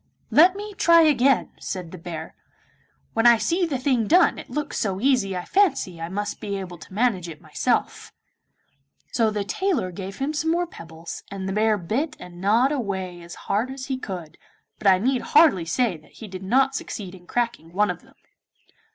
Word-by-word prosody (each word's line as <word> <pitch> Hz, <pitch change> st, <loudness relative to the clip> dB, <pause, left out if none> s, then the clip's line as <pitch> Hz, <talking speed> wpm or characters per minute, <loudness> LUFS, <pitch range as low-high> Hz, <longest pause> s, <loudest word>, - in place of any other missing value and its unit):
'Let 355 Hz, +5 st, +6 dB
me 415 Hz, +1 st, -6 dB
try 335 Hz, -3 st, +5 dB
again,' 275 Hz, -4 st, +3 dB
said 180 Hz, -3 st, -5 dB
the 185 Hz, -, -8 dB
bear; 165 Hz, -1 st, -7 dB, 0.8 s
'when 225 Hz, +1 st, +4 dB
I 235 Hz, -1 st, +8 dB
see 345 Hz, +8 st, +1 dB
the 285 Hz, -4 st, -1 dB
thing 255 Hz, -4 st, +1 dB
done 360 Hz, +3 st, +4 dB
it -, -, -10 dB
looks 300 Hz, -1 st, -3 dB
so 195 Hz, -3 st, -1 dB
easy 215 Hz, -7 st, +2 dB
I 180 Hz, -, -5 dB
fancy 270 Hz, -, +1 dB
I 165 Hz, -, -4 dB
must 205 Hz, +2 st, -3 dB
be 200 Hz, -1 st, -3 dB
able 180 Hz, -3 st, -7 dB
to 165 Hz, -, -13 dB
manage 195 Hz, -5 st, 0 dB
it 155 Hz, -2 st, -9 dB
myself.' -, -, -1 dB, 1.0 s
So 230 Hz, -2 st, +2 dB
the 210 Hz, -1 st, -2 dB
tailor 275 Hz, -, -1 dB
gave 195 Hz, +2 st, -7 dB
him 280 Hz, +3 st, -2 dB
some 310 Hz, +1 st, -1 dB
more 345 Hz, +2 st, +1 dB
pebbles, 165 Hz, -, -9 dB
and 195 Hz, -1 st, -5 dB
the 190 Hz, -, -2 dB
bear 215 Hz, +1 st, +2 dB
bit 260 Hz, -, -2 dB
and 175 Hz, 0 st, -11 dB
gnawed 230 Hz, +8 st, +3 dB
away 190 Hz, -9 st, -3 dB
as 170 Hz, 0 st, -10 dB
hard 215 Hz, +6 st, 0 dB
as 265 Hz, 0 st, -6 dB
he -, -, -1 dB
could, 180 Hz, -9 st, -7 dB, 0.4 s
but -, -, -1 dB
I 190 Hz, -1 st, +7 dB
need 250 Hz, +6 st, +1 dB
hardly 290 Hz, -, +4 dB
say 215 Hz, +1 st, 0 dB
that 155 Hz, -1 st, -22 dB
he 220 Hz, -, -10 dB
did 185 Hz, -1 st, -8 dB
not 265 Hz, +7 st, +2 dB
succeed 195 Hz, -8 st, -5 dB
in 180 Hz, -2 st, -14 dB
cracking 235 Hz, -9 st, -2 dB
one 205 Hz, +4 st, +2 dB
of -, -, -8 dB
them. -, -, -22 dB
210 Hz, 195 wpm, -24 LUFS, 185-270 Hz, 1.0 s, I